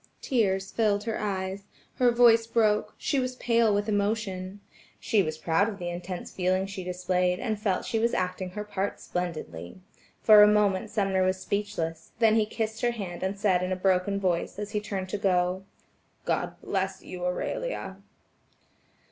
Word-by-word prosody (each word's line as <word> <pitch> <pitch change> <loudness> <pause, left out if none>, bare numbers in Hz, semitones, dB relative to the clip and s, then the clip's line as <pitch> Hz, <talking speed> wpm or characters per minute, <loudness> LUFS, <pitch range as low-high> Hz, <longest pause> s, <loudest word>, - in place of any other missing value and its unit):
Tears 195 -6 0
filled 210 -3 +1
her 225 0 -3
eyes, 195 -1 -3 0.3
her 250 -1 +4
voice 235 -1 +5
broke, 215 -2 +1
she 280 - 0
was 255 0 -2
pale 230 -3 +2
with 205 +1 0
emotion. 200 -2 -1 0.4
She 215 - +2
was 155 -3 -3
proud 165 +6 +1
of 205 - -7
the 175 -2 -4
intense 175 +1 -6
feeling 185 +1 0
she 195 -1 -6
displayed, 180 0 0
and 220 -4 -2
felt 195 -4 +1
that - - -11
she 225 - -1
was 235 +1 +1
acting 185 0 -2
her 210 +3 -5
part 200 -1 -3
splendidly. 160 - -5 0.4
For 215 -1 +9
a 210 - +9
moment 210 -1 +2
Sumner 195 -3 +1
was 185 0 +1
speechless, 170 -7 -3
then 225 -2 +4
he 220 -1 +3
kissed 220 0 -3
her 240 - +3
hand 190 -6 -6
and 190 +1 -2
said 195 -3 +2
in 185 +1 -2
a - - +1
broken 190 +1 +1
voice, 180 -2 -1
as 210 0 -5
he 210 - 0
turned 190 -3 -4
to 205 - -3
go: 185 -1 +1 0.6
"God - - -1
bless 195 -1 -2
you, 180 -1 -7
Aurelia." 190 - -3
195 Hz, 175 wpm, -27 LUFS, 185-215 Hz, 0.6 s, For